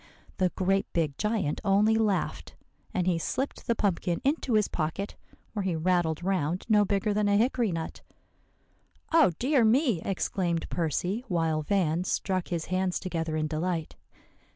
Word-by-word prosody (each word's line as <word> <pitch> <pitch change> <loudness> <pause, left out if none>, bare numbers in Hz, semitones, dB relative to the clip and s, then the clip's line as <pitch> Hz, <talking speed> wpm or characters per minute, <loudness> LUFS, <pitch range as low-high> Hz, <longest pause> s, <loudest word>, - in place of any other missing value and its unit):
"The 185 -2 +2
great 195 +1 +1
big 155 -5 0
giant 210 -8 0
only 205 +2 +4
laughed; 210 -4 -1 0.4
and 180 - 0
he 175 -2 +1
slipped 265 - -3
the 235 - +2
pumpkin 180 -4 0
into 275 -3 0
his 210 -2 +3
pocket, 165 +5 -3 0.4
where 210 - -2
he 190 -3 -1
rattled 170 -1 +1
round 180 -2 -1
no 210 -2 +5
bigger 205 +1 0
than 210 0 +1
a 200 0 +4
hickory 235 -1 +2
nut." 165 -1 -5 1.1
"Oh, 325 - +6
dear 265 -1 +3
me!" 230 - +3
exclaimed 180 -3 -1
Percy, 175 - -1
while 165 -5 0
Van 170 0 +1
struck 185 0 -1
his 170 -3 -3
hands 185 0 0
together 165 -4 -3
in 155 - 0
delight. 160 +1 -2
185 Hz, 155 wpm, -28 LUFS, 165-210 Hz, 1.1 s, Oh